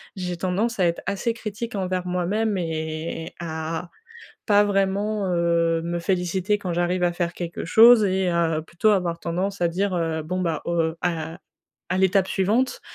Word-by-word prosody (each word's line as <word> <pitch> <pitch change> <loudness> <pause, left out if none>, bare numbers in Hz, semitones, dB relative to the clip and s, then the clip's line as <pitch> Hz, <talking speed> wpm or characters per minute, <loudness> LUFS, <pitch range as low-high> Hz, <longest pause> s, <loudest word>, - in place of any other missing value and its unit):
j'ai 180 -2 -4
tendance 195 +6 -1
à 180 - +4
être 170 - -2
assez 200 +4 -1
critique 225 0 -6
envers 185 -2 -2
moi-même 195 +4 0
et 160 -1 -4
à 165 +1 -4 0.6
pas 205 -1 +5
vraiment, 200 +1 0
heu, 170 -1 +2
me 170 +1 -2
féliciter 185 +3 0
quand 185 -3 -4
j'arrive 175 +1 0
à 175 - +2
faire 175 -1 -1
quelque 170 -1 -5
chose 225 +5 +7
et 190 -1 +1
heu, 165 -2 +1
plutôt 170 +7 +1
avoir 180 -5 +1
tendance 185 +4 -2
à 170 - +3
dire: 190 +3 -1
«Heu, 165 -2 -1
bon 180 +4 -3
bah, 165 -3 -1
heu, 165 -1 0
à 165 0 -2 0.5
à 185 - +1
l'étape 190 0 +3
suivante». 220 +7 +1
180 Hz, 165 wpm, -24 LUFS, 170-200 Hz, 0.6 s, chose